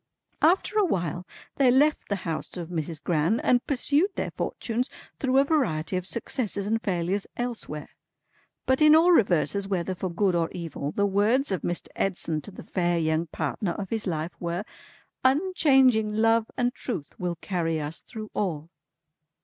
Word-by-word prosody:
"After 380 +6 +3
a - - +5
while, 175 - -1 0.3
they 270 -2 +5
left 290 +4 +3
the 200 - +1
house 165 +2 -4
of 170 -2 -5
Mrs. 160 -3 -4
Gran, 170 +7 +1
and 245 -1 +2
pursued 290 +6 +2
their - - -2
fortunes 240 +2 -2 0.3
through 265 -1 +2
a 275 - +7
variety 210 - 0
of 185 0 -2
successes 215 -2 -2
and 225 +2 0
failures 185 0 -1
elsewhere. 230 -11 -4 0.8
But 260 +2 +2
in 305 0 +8
all 335 +3 +6
reverses, 200 - +3
whether 185 -1 -1
for 185 +1 -4
good 185 +2 +1
or 170 -1 +1
evil, 160 -4 -4
the 200 - +1
words 210 +7 +2
of 190 - -1
Mr. 175 - -2
Edson 165 -5 -1
to - - -5
the 190 - -10
fair 175 -2 0
young 160 0 0
partner 165 +4 -2
of 195 0 -6
his 220 -2 -1
life 160 -1 -2
were, 170 +2 -2 0.6
'Unchanging 265 - +4
Love 225 0 +3
and 245 0 +1
Truth 195 - -6
will 180 -1 -2
carry 165 -2 -2
us 150 +2 -5
through 215 -2 -9
all!'" 165 -5 -2
195 Hz, 165 wpm, -26 LUFS, 170-245 Hz, 0.8 s, in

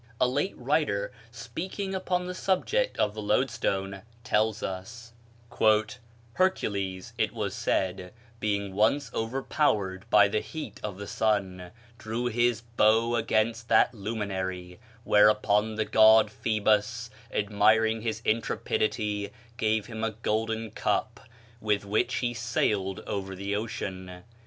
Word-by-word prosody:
A 125 - +4
late 145 +9 -1
writer, - - 0 0.2
speaking 190 +3 -5
upon 180 -1 -1
the 180 - -4
subject 405 - 0
of 105 - +1
the 110 - -6
loadstone, 100 -4 0 0.2
tells 110 -1 +1
us: 115 +5 -6 1.2
"Hercules, 100 - -1
it 110 - +1
was 105 -4 -2
said, 90 -1 -1 0.3
being 100 -3 -1
once 110 +8 +2
overpowered 110 -5 -1
by 105 -1 +6
the 105 +2 0
heat 110 +9 -7
of 100 -3 -4
the 100 - -6
sun, 95 -4 -1 0.3
drew 115 +3 -3
his 120 -1 +1
bow 115 0 +2
against 115 0 0
that - - +4
luminary; 95 -4 -4 0.2
whereupon 105 0 +4
the 110 0 0
god 110 0 +6
Phoebus, 110 +1 0 0.2
admiring 110 +2 +2
his 110 0 -3
intrepidity, 105 -1 -1 0.3
gave 110 -3 +1
him 110 -1 -6
a 115 - +1
golden 110 0 -1
cup, - - -1 0.4
with 105 -2 0
which 110 +5 0
he 120 -1 -1
sailed 105 -5 -1
over 95 -1 -4
the 100 +2 -3
ocean. 95 -4 -5
110 Hz, 125 wpm, -28 LUFS, 100-115 Hz, 1.2 s, by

